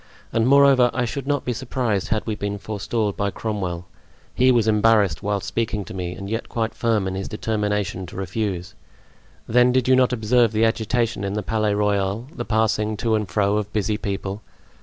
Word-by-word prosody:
And 115 0 +2
moreover, 135 -2 +6
I 130 -1 +1
should 135 +3 -5
not 145 -1 0
be 125 - 0
surprised 120 -5 -2
had 110 -1 -1
we 110 - -2
been 100 -1 -3
forestalled 105 0 -2
by 100 0 0
Cromwell. 95 -5 -4 0.5
He 130 +1 +4
was 115 -3 +2
embarrassed 105 -5 +3
whilst 100 -1 -2
speaking 105 -1 -2
to - - -9
me 90 -2 -4
and 100 - -7
yet 115 +3 -3
quite 110 -1 -2
firm 110 -5 0
in 95 - -3
his 95 +1 -4
determination 105 -4 -2
to - - -11
refuse. 95 -1 -3 0.7
Then 125 +2 +4
did 130 -1 +1
you 130 - +6
not 130 -1 +3
observe 115 0 +2
the 110 +1 +3
agitation 115 -1 0
in 100 0 -2
the 105 0 -2
Palais 110 0 0
Royal, 100 +1 0
the - - -5
passing 110 -1 +1
to 115 +2 0
and 105 -2 0
fro 105 0 +1
of 105 -1 -3
busy 105 0 0
people? 100 0 -4
105 Hz, 195 wpm, -22 LUFS, 100-115 Hz, 0.7 s, moreover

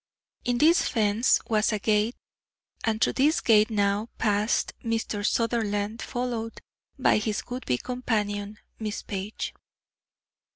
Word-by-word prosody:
In 245 -1 +1
this 320 +6 +4
fence 220 0 +3
was 215 0 +2
a 215 - 0
gate, 210 +3 +1 0.7
and 220 -1 0
through - - +2
this 295 +4 +3
gate 215 -1 +4
now 205 +1 0
passed 210 0 +1
Mr. 225 -2 -2
Sutherland, 220 -1 0
followed 240 -3 -3 0.4
by - - +4
his 215 0 -2
would 250 +1 -5
be 125 - +2
companion, 210 - -2 0.2
Miss 215 -1 -4
Page. 200 +1 -4
220 Hz, 125 wpm, -26 LUFS, 205-235 Hz, 0.7 s, this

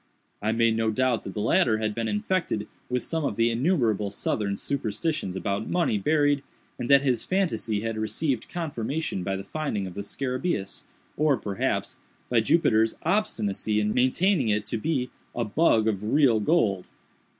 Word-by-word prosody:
I 110 +2 +1
made 115 0 +3
no 115 0 +1
doubt 125 +1 +1
that 95 - -7
the 105 - -2
latter 120 - +3
had 110 -1 -1
been 115 +1 -2
infected 185 - -1 0.2
with 125 0 -1
some 160 -1 -2
of 120 - -1
the 115 +1 +2
innumerable 115 - +1
Southern 100 0 -2
superstitions 140 - -2
about 100 +2 -2
money 165 -12 +1
buried, 145 +4 +2 0.4
and 120 - -3
that 140 0 +6
his 125 -5 +1
phantasy 115 - 0
had 115 0 -3
received 120 +3 -1
confirmation 150 - -3
by 95 +1 -1
the 95 - -5
finding 110 -4 -3
of 90 - -7
the 100 - -5
scarabæus, 130 - -3 0.3
or, 150 -3 +3
perhaps, 100 -3 -2 0.3
by 120 - +4
Jupiter's 110 -3 +3
obstinacy 110 - 0
in 105 0 0
maintaining 165 - +2
it 105 0 +1
to 115 - -3
be 130 -2 -1 0.2
"a 120 - 0
bug 110 -1 +3
of 105 -2 -1
real 135 -7 +4
gold." 105 - +1
115 Hz, 165 wpm, -26 LUFS, 105-150 Hz, 0.4 s, that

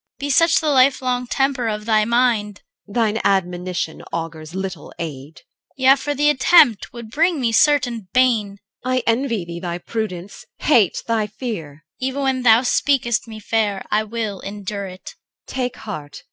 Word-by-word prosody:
CHR. - - -58
Be 285 0 -3
such 330 +4 +4
the 310 -2 0
life 265 0 +4
long 250 -1 -1
temper 270 -2 0
of 210 -1 -3
thy 215 -1 +3
mind! 230 -3 +1 0.2
EL. 200 - -13
Thine 225 -2 +1
admonition 180 -3 -1
augurs 165 0 -6
little 190 -5 -5
aid. 150 -2 -7
CHR. - - -16 0.4
Yea. 265 +1 +6
For 290 +2 -3
the 295 +2 +2
attempt 260 - +4
would 235 -2 -10
bring 330 +3 +2
me 240 -3 +1
certain 245 -5 +2
bane. 225 -6 +2 0.3
EL. 255 0 -1
I 255 - +1
envy 230 -5 0
thee 170 0 -7
thy 175 -1 -4
prudence, 200 -2 -5
hate 230 - +2
thy 225 -2 0
fear. 185 - -7
CHR. 155 - -67
Even 265 +2 -2
when 265 -1 0
thou 230 -1 +6
speak'st 245 -3 +1
me 220 -1 -9
fair, 210 -2 -1
I 210 - +3
will 215 -3 -4
endure 200 0 -5
it. 185 0 -10
EL. - - -37 0.3
Take 250 -2 -2
heart. 150 -10 -7
220 Hz, 180 wpm, -20 LUFS, 190-255 Hz, 0.4 s, Yea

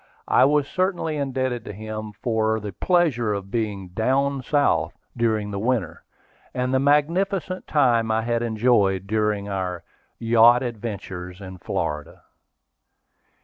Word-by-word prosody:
I - - +5
was 145 0 +2
certainly 185 -4 -1
indebted 130 -4 -2
to - - -7
him 110 +1 -6
for 110 -2 +1
the 105 -2 -6
pleasure 130 - +1
of 100 -1 -7
being 105 -5 -3
"Down 135 +7 0
South" 145 +2 +1 0.2
during 110 -3 0
the 100 - -3
winter, 115 -5 -1 0.5
and 125 0 -1
the 130 - +3
magnificent 175 +7 +1
time 120 -6 +2
I 110 0 +1
had 115 0 0
enjoyed 110 -5 +2
during 105 -1 0
our 95 -3 -3 0.3
"Yacht 120 +2 +5
Adventures 100 -6 -6
in 95 -2 -9
Florida." 75 -3 -4
115 Hz, 130 wpm, -23 LUFS, 105-135 Hz, 0.5 s, I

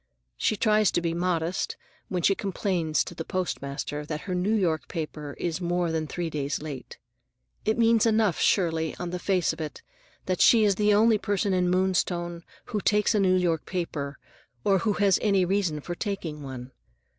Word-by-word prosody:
She 215 - +1
tries 215 -2 +3
to - - +2
be 170 -1 -1
modest 175 0 -1 0.3
when 180 -2 -2
she 195 - +5
complains 185 -6 0
to - - -8
the 160 - -5
postmaster 150 -5 -3
that 150 0 -5
her 185 - -4
New 185 +5 +1
York 170 -7 0
paper 150 -3 -5
is 175 +1 -2
more 175 -1 0
than 160 -1 -1
three 170 0 -3
days 145 -1 -2
late. 150 -4 -8 0.7
It 220 +2 +1
means 230 -1 +4
enough, 215 -5 +2
surely, 160 -4 +1
on 175 -1 -4
the 180 - -3
face 185 -2 +1
of - - -8
it, 155 - -6 0.4
that 185 -1 -1
she 230 -2 +6
is 205 -1 +4
the 210 +2 +2
only 215 +1 +4
person 205 -1 0
in 180 -1 +2
Moonstone 175 -2 0 0.2
who 210 - -3
takes 210 +2 +2
a 210 - +2
New 185 -2 +4
York 170 -4 0
paper 150 -6 -3 0.5
or 195 -1 +3
who 210 +3 +1
has 200 -3 +3
any 195 -4 +3
reason 180 -5 0
for 175 - -5
taking 175 -6 -4
one. 130 -2 -7
180 Hz, 185 wpm, -27 LUFS, 160-200 Hz, 0.7 s, she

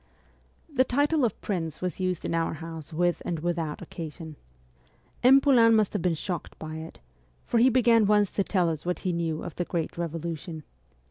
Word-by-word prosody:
The 260 -2 +4
title 285 +3 +1
of 235 - 0
prince 165 -6 -3
was 180 0 -3
used 185 -2 -1
in - - -2
our 165 -1 0
house 160 0 -8
with 175 +2 0
and 170 - -2
without 165 -2 -3
occasion. 160 -1 -8 0.9
M. 265 +2 +7
Poulain 240 -5 +5
must 215 -2 +2
have 205 - -1
been 175 -1 +1
shocked 175 +1 -5
by 155 0 -6
it, 160 +1 -9 0.5
for 235 - +1
he 250 +3 +6
began 235 -3 +4
once 210 -1 +3
to 200 - 0
tell 180 -3 +1
us 155 -2 -5
what 180 0 -2
he 185 -2 -1
knew 165 -2 -2
of 175 - -7
the 175 - 0
great 170 -1 -3
Revolution. 165 -1 -4
175 Hz, 190 wpm, -27 LUFS, 165-215 Hz, 0.9 s, M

